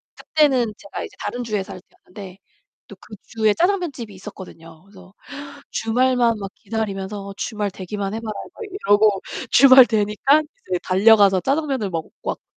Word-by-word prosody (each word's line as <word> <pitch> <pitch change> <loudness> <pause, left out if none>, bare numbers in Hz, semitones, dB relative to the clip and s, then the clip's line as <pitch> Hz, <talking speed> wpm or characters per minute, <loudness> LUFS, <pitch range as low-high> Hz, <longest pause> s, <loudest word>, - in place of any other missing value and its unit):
그때는 260 -8 +1
제가 200 - -8
이제 - - -10
다른 245 0 -4
주에 210 -4 -2
살 190 -2 -10
때였는데 190 0 -13 0.5
또 - - -12
그 215 - -13
주에 220 -2 +1
짜장면 355 - 0
집이 230 -5 -9
있었거든요. 175 -4 -12
그래서 190 -1 -17 0.6
주말만 240 0 +1
막 195 -1 -6
기다리면서 200 -2 -5
'주말 210 -3 -3
되기만 195 +2 -5
해 225 - -4
봐라.' 220 -1 -6 0.2
막 - - -10
이러고 210 - +2 0.3
주말 260 -1 +8
되니깐 220 +8 +2 0.2
이제 180 - 0
달려가서 195 0 +5
짜장면을 270 - -1
먹고 165 -2 -5
왔죠. - - -4
210 Hz, 350 characters per minute, -21 LUFS, 195-245 Hz, 0.6 s, 주말